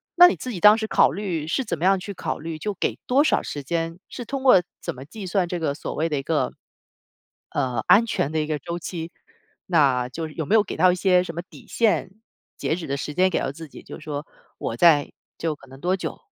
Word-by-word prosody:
那 355 0 +10
你 355 - +1
自 255 - -7
己 195 - -5
当 210 +3 +8
时 220 - -2
考 - - +4
虑 180 -7 -3
是 265 +11 0
怎 185 -8 -3
么 170 - -2
样 195 0 +5
去 200 +2 -6
考 - - -4
虑 160 +1 -5
就 210 +5 -3
给 - - -2
多 270 +4 +4
少 - - +2
时 145 - -5
间， 165 +3 -2
是 245 - -6
通 275 +3 -4
过 195 -9 +7 0.2
怎 - - -4
么 130 - -9
计 200 +6 -9
算 180 0 +1
这 175 0 -3
个 150 -4 0
所 - - -5
谓 160 +2 -1
的 150 - -1
一 - - -1
个， 160 0 0 1.0
呃， 130 -3 -1
安 225 +4 +7
全 145 -9 -1
的 160 - -1
一 155 - -1
个 155 -1 -1
周 170 +3 -5
期， 170 -1 -6 0.6
那 135 -8 +3
就 160 +4 -5
有 155 +1 -4
没 210 - +1
有 215 - +6
给 210 - -6
到 185 -1 +5
一 - - +1
些 180 -1 +3
什 170 - -7
么 170 - -4
底 185 - -16
线， 210 -5 +1 0.4
截 160 - -1
止 170 -3 -6
的 140 - -2
时 150 - -4
间 185 +3 +4
给 - - 0
到 - - -2
自 160 +4 -9
己？ - - -12
就 - - -10
是 155 - -13
说 150 0 -4 0.3
我 115 - -3
在 150 0 +5 0.3
就 160 -2 -2
可 135 - -17
能 135 +1 -14
多 180 +2 +1
久 185 - -6
170 Hz, 275 characters per minute, -24 LUFS, 150-190 Hz, 1.0 s, 那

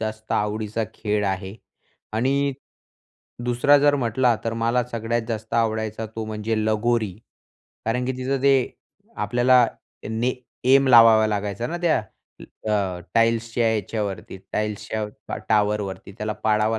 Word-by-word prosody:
जास्त 110 0 -4
आवडीचा 105 +1 -1
खेळ 105 -1 -1
आहे 95 0 -3 0.6
आणि 140 +5 +1 0.9
दुसरा 125 +4 +4
जर 145 0 +4
म्हटला 120 -1 +2
तर 115 - -1
मला 115 +2 +1
सगळ्यात 115 0 -1
जास्त 110 -1 -4
आवडायचा 110 -1 0
तो 110 - -3
म्हणजे 110 +1 -2
लगोरी 110 -1 +1 0.7
कारण 125 +3 0
की 130 - 0
तिथं 130 +1 -2
ते 140 0 +5 0.6
आपल्याला 125 0 +4 0.4
ने 115 +3 0 0.4
ऐम 135 0 +5
लावावा 115 -3 +7
लागायचा 105 +1 -2
ना 170 - -4
त्या 170 -2 +3 0.7
अ, 95 -4 0
टाईल्सच्या 115 0 +2
याच्यावरती 100 -2 -4 0.2
टाईल्सच्या 105 0 -2
ट 105 - -8
टॉवरवरती. 105 -2 0
त्याला 105 0 -3
पडावं 110 +1 +2
110 Hz, 125 wpm, -23 LUFS, 105-120 Hz, 0.9 s, लावावा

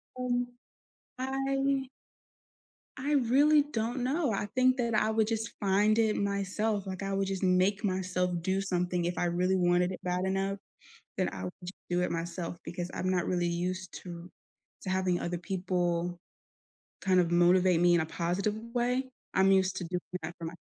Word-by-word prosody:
Um, 245 -1 0 0.7
I 270 0 0 1.1
I 285 +3 -2 0.2
really 295 +4 +6
don't 230 +3 -1
know. 280 +1 +1
I 205 0 -1
think 255 0 +4
that 235 -2 0
I 215 0 +2
would 220 -1 +2
just 225 0 -2
find 205 +2 +3
it 220 -1 +3
myself, 200 +1 -1
like, 190 +1 -5
I 195 0 -2
would 195 0 0
just 195 0 -3
make 190 +3 +2
myself 185 -2 0
do 190 +2 0
something 180 -2 -1
if 175 - -2
I 175 - +1
really 180 +2 +1
wanted 180 0 +3
it 185 - -6
bad 180 +1 -1
enough, 195 +1 0 0.6
then - - +2
I 95 0 -6
would 90 - -4
j 180 - -4 0.2
do 175 0 +2
it - - 0
myself 170 +1 -4
because 175 0 -5
I'm 185 - -1
not 180 -2 +1
really 175 -1 0
used 180 +2 -2
to 175 0 -9 0.5
to 190 - -4
having 185 -1 +1
other 175 0 -2
people 175 -1 -1 0.8
kind 185 -1 +4
of 170 -1 +1
motivate 175 0 +4
me 175 0 +5
in 170 - +4
a 160 - -1
positive 180 +6 -1 0.2
way. 250 +2 0 0.2
I'm 190 +1 +4
used 190 -1 +3
to 185 - -3
doing 180 +1 -2 0.2
that 170 +2 -5
for 165 - -7
my 165 - -5
190 Hz, 180 wpm, -30 LUFS, 175-215 Hz, 1.1 s, really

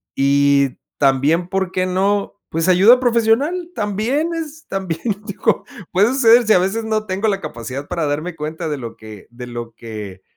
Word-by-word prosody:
y 140 0 +3 0.2
también 145 +5 +2
por 190 -1 -1
qué 185 0 0
no, 200 +2 0
pues, 165 +2 -1
ayuda 200 +8 +6
profesional, 255 +9 +1
también 225 - -1
es, 315 -1 -6
también 185 -4 -4 0.3
digo, 200 -1 0 0.3
puede 195 +3 +4
suceder 235 -3 +5
si 220 - +6
a - - +5
veces 195 +5 -1
no 215 -1 -1
tengo 195 +2 -1
la 195 -2 0
capacidad 130 +5 -6
para 170 -4 -2
darme 155 +4 -3
cuenta 160 +2 -5
de 150 - -2
lo 115 -3 -8
que 110 -2 -12
de 125 +1 -8
lo 120 -1 -7
que, 105 -5 -8
185 Hz, 175 wpm, -19 LUFS, 140-220 Hz, 0.3 s, ayuda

